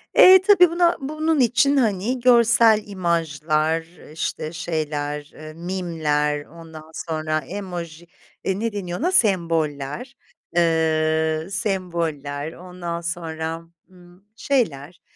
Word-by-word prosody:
Eee, 375 0 +9
tabii 365 -4 +7
buna, 345 0 +2
bunun 310 +2 -1
için, 260 +3 +3
hani, 225 +1 0
görsel 235 -3 +5
imajlar, 165 -4 -1 0.3
işte, 160 0 -4
şeyler, 150 -2 -4
eee, 155 0 -10
meme'ler, 160 -4 -2
ondan 160 -1 -13
sonra 155 -2 -2
emoji, 175 0 -7 0.4
eee, 190 0 -1
ne 230 +1 -1
deniyor 180 -4 -4
ona, 350 +6 0
semboller, 170 - 0 0.4
eee, 160 -1 +1
semboller, 165 - -3
ondan 175 -1 -6
sonra, 165 -1 -4 0.3
ımm, 180 +1 -20
şeyler, 175 - -2
170 Hz, 105 wpm, -22 LUFS, 155-205 Hz, 0.4 s, Eee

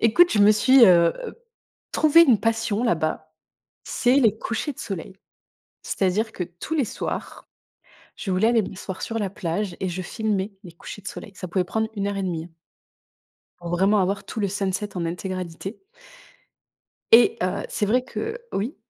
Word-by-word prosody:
Écoute, 340 +11 +5
je - - +1
me 205 +1 +7
suis, 255 +4 +6
heu 170 -4 +6
heu, - - -9 0.6
trouvé 315 +2 +6
une 250 -10 +4
passion 225 -1 0
là-bas: 155 -6 -1 0.5
c'est 245 +2 +2
les 225 -6 +4
couchers 230 +8 -3
de - - -22
soleil. 190 -1 -6 0.7
C'est-à-dire 205 +4 0
que, - - -4
tous 175 - -7
les 290 - +2
soirs, - - -6 0.7
je 195 - -5
voulais 190 +5 +3
aller 230 -2 +3
m'asseoir 190 0 -7
sur 225 - -3
la 200 -3 -2
plage 185 +1 -3
et 190 - -1
je 180 +1 -4
filmais 210 0 -2
les 175 - -10
couchers 185 +4 -10
de - - -5
soleil. 205 - -9
Ça 185 - -6
pouvait 180 +1 0
prendre 220 +4 -1
1 200 0 -1
heure 200 - -3
et 195 - -2
demie. 170 -3 -3 1.1
Pour 175 -1 -7
vraiment 195 +4 +3
avoir 195 +2 -1
tout - - -6
le 200 - +1
sunset 200 +1 -3
en 170 - -1
intégralité 185 - -5 1.3
et 235 +1 +7
heu, 185 - -1
c'est 210 - -1
vrai 245 +5 +2
que 255 - -7
heu 450 +2 -3 0.2
Oui? 230 - -2
200 Hz, 180 wpm, -24 LUFS, 185-225 Hz, 1.3 s, me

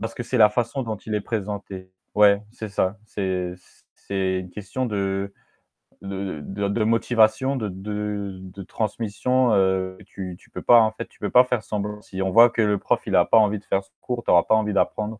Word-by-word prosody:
parce 115 0 -4
que - - -5
c'est 125 - -3
la 105 -1 +7
façon 120 +4 -1
dont 110 -3 -4
il 105 +1 -6
est 105 - 0
présenté. 100 -4 -5 0.2
Ouais, 105 0 +5
c'est 110 -2 -7
ça, 95 0 -1
c'est 95 -3 -3 0.4
c'est 95 -1 -2
une 90 -1 -10
question 105 +7 -4
de 100 -2 -2 0.7
de 95 -4 -5
de 100 +7 -2
motivation, 115 +3 +2
de 110 -6 -3
de 105 +1 -4
de 95 +1 -10
transmission, 115 +4 0
heu, 95 -1 +1
tu 95 -2 -7
tu - - -24
peux - - -7
pas 120 - +7
en 110 - +2
fait, 110 - -7
tu - - -26
peux 105 - -2
pas 125 - +7
faire 125 -3 -1
semblant. 105 0 -4
Si 95 -2 -7
on 95 - 0
voit 115 +3 +8
que 115 - -1
le 105 -1 +2
prof, - - 0
il - - -2
n'a - - +5
pas - - +4
envie 105 -1 +3
de - - -25
faire 95 - 0
ce - - -26
cours, 125 -1 -4
tu - - -4
n'auras 85 -1 +6
pas 110 - +3
envie 105 -1 0
d'apprendre. 105 +4 -1
105 Hz, 215 wpm, -23 LUFS, 95-110 Hz, 0.7 s, voit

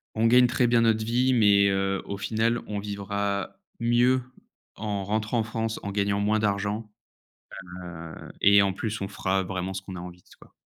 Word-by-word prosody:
on 110 - +1
gagne 125 +2 +6
très 120 0 +1
bien 120 -1 +3
notre 110 -1 +2
vie 125 +3 +2
mais, 100 -4 +5
heu, 95 0 0
au 100 - -5
final, 110 +3 0
on 105 -1 -3
vivra 100 - -3 0.2
mieux 120 +2 +3 0.5
en 105 -2 -3
rentrant 110 +3 -1
en - - +1
France 110 0 -3
en 100 - -4
gagnant 100 0 0
moins 105 +1 +1
d'argent, 105 +1 -1 0.8
heu 90 -2 -9 0.3
et 100 0 +6
en 100 - +1
plus, 110 +3 -4
on 100 - -3
fera 95 -1 -1
vraiment 95 +1 -4
ce 95 - -5
qu'on 95 -1 -8
a - - -6
envie 90 0 -10
s - - -20
quoi. - - -19
100 Hz, 190 wpm, -26 LUFS, 100-115 Hz, 0.8 s, gagne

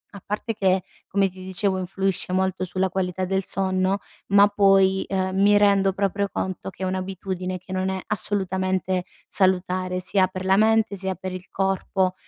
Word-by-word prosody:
a 195 - -9
parte 210 +2 -3
che, 190 -2 +1 0.2
come 195 0 +2
ti 185 0 -11
dicevo, 190 0 -1
influisce 190 0 -2
molto 190 0 0
sulla 185 +1 -1
qualità 185 0 -2
del 190 +1 0
sonno, 190 0 0 0.3
ma 200 +1 +6
poi, 195 -2 +4
ehm, 190 -1 -1
mi 205 0 +6
rendo 200 -1 +4
proprio 200 0 0
conto 190 0 -3
che 190 - -8
è - - +1
un'abitudine 185 0 -3
che 185 +1 -13
non 185 0 0
è 190 0 -2
assolutamente 185 -2 -1 0.2
salutare 185 -1 +1
sia 185 0 +2
per 185 0 -6
la 190 - +4
mente 220 -1 +3
sia 190 -1 -3
per 185 +1 -6
il 185 0 -8
corpo. 190 -1 0
190 Hz, 170 wpm, -24 LUFS, 185-195 Hz, 0.3 s, ma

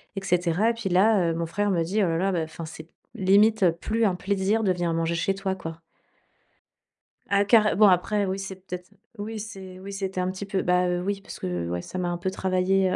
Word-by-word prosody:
et 195 - -4
cetera 180 +3 +2
et - - +1
puis 230 -4 -4
là, 185 -1 +4
heu, - - -1
mon 165 0 -2
frère 205 +5 0
me 170 - +1
dit: 200 +5 0
«Oh - - +2
là, 165 0 0
là, 195 +2 +1
bah, 175 - 0
enfin, 160 +1 -7
c'est 160 0 -10 0.3
limite 200 -1 +4
plus 225 +1 +1
un 195 - +2
plaisir 200 +4 0
de 190 - +3
venir 175 -2 -1
manger 165 +1 0
chez 180 +4 0
toi, 195 -1 -2
quoi». 165 -3 -7 1.5
Ah 200 0 +3
carrem 215 0 +5
bon 210 0 +7
après, 200 +3 +2
oui, 190 +1 -2
c'est 195 0 -6
peut-être, 180 -1 -7 0.3
oui, 215 +2 -5
c'est 190 -4 -9
oui, 195 +1 -8
c'était 190 -1 -3
un 180 0 -1
petit 190 +2 -6
peu, 195 -1 -1
bah 180 0 +2
heu, 180 0 0
oui, 195 +1 -2
parce - - -10
que 90 -2 -3
ouais 90 0 -2
ça 185 - -8
m'a 180 -1 -1
un 175 - -2
peu 185 +2 -2
travaillé. 190 0 +1
190 Hz, 235 wpm, -25 LUFS, 175-200 Hz, 1.5 s, bon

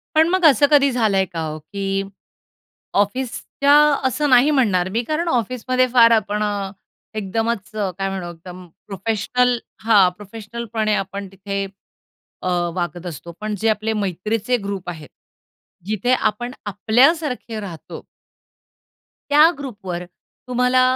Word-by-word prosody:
पण, 320 +1 +5
मग 370 -1 +2
असं 290 -1 +6
कधी 280 -2 +5
झालंय 215 -6 +2
का 170 -3 -6
हो, 155 -1 -4
की 195 +4 -3 1.0
ऑफिसच्या 260 +5 0 0.3
असं 295 +3 0
नाही 255 +3 +6
म्हणणार 200 -10 +2
मी, 225 +5 -1
कारण 310 +6 -2
ऑफिसमध्ये 255 +1 +1
फार 235 -2 +7
आपण 210 -1 +1
अ, 200 -2 -2 0.4
एकदमच 215 +1 -2
अ, 205 -3 -1
काय 195 0 -1
म्हणू 190 -2 -5
एकदम 180 +2 -11 0.2
प्रोफेशनल 225 +5 0 0.3
हां 210 -5 +5
प्रोफेशनलपणे 220 +1 -3
आपण 195 0 -4
तिथे 200 +1 -4 0.8
अ, - - -2 0.3
वागत 175 -1 -4
असतो, 170 0 -7
पण 215 0 -3
जे 225 - +2
आपले 215 0 0
मैत्रीचे 210 +4 -1
ग्रुप 200 -3 -5
आहेत 155 -4 -9 0.8
जिथे 215 +4 0
आपण 240 0 -1
आपल्यासारखे 240 - +1
राहतो 180 -6 -8 1.3
त्या 300 +3 +7
ग्रुपवर 200 -10 -6 0.4
तुम्हाला, 250 +1 +2
215 Hz, 125 wpm, -21 LUFS, 195-250 Hz, 1.3 s, फार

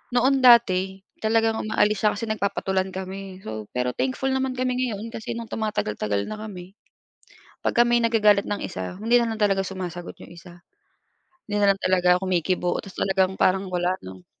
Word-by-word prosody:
noon 265 +2 +3
dati 195 -6 +5 0.2
talagang 225 0 +1
umaalis 210 -1 +1
siya 210 - +2
kasi 230 - -4
nagpapatulan 195 -2 -1
kami. 190 0 -7
So, 110 -1 -6
pero 125 0 0
thankful 265 - -1
naman 265 -1 -1
kami 255 0 -1
ngayon 225 -1 -5
kasi 225 - -5
nung 230 -1 -7
tumatagal-tagal 105 - -2
na 215 - -6
kami 190 -4 -9 0.9
pagka 240 - +3
may 240 0 +3
nagagalit 210 -3 +3
ng 205 - -3
isa 95 - -5
hindi 235 +2 +4
nalang 225 -2 -2
talaga 195 -2 +3
sumasagot 180 -2 -6
yung - - -14
isa. 175 0 -14 0.8
Hindi 205 -1 -1
nalang 195 -1 +4
talaga 180 -1 +3
kumikibo 180 -1 0
ta's 195 - -12
talagang 190 0 +1
parang 190 0 +2
wala, 180 +1 +1
'no? 95 -1 -11
195 Hz, 165 wpm, -24 LUFS, 180-225 Hz, 0.9 s, dati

